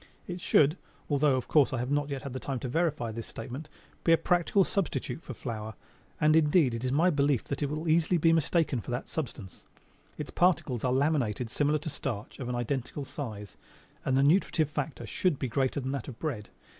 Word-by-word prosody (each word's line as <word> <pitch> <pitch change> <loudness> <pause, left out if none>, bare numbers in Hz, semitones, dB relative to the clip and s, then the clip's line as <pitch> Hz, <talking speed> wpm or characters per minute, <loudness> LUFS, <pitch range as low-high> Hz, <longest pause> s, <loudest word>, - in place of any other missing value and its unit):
It 180 0 -6
should, 150 +2 +4 0.3
although 145 -1 +4
of 130 - -2
course 150 -4 +4
I - - 0
have 125 +3 -2
not 145 0 +1
yet 140 -1 -4
had 130 -2 -5
time 135 -2 -3
to - - -3
verify 150 -4 0
this 115 +1 -6
statement, 140 +5 -7 0.3
be 165 - +3
a 165 - +7
practical 175 +4 +3
substitute 190 -3 -2
for 130 - -8
flour; 110 -3 -5 0.4
and 155 +1 +4
indeed, 150 -4 +4
it 115 +1 -4
is 130 - 0
my 165 +6 +4
belief 140 -4 +2
that 140 - -4
it 145 - 0
will 155 +3 -3
easily 165 +2 +3
be 165 0 +4
mistaken 160 -5 +1
for - - -10
that 125 +1 -3
substance. 115 - -6 0.5
Its 150 - -5
particles 165 -9 +2
are 125 - +2
laminated 130 -5 +1
similar 145 +3 +2
to 150 +1 -5
starch, 115 -8 -5
of 125 -2 -4
an 125 - -1
identical 130 +3 -3
size, 110 -9 -7 0.5
and 130 -1 +1
the 135 - +4
nutritive 160 -1 +3
factor 150 0 -3
should 180 -6 0
be 130 - -2
greater 130 +4 0
than 130 0 -3
that 140 -4 -4
of 125 -5 -8
bread. 125 -10 -4
140 Hz, 205 wpm, -29 LUFS, 125-155 Hz, 0.5 s, a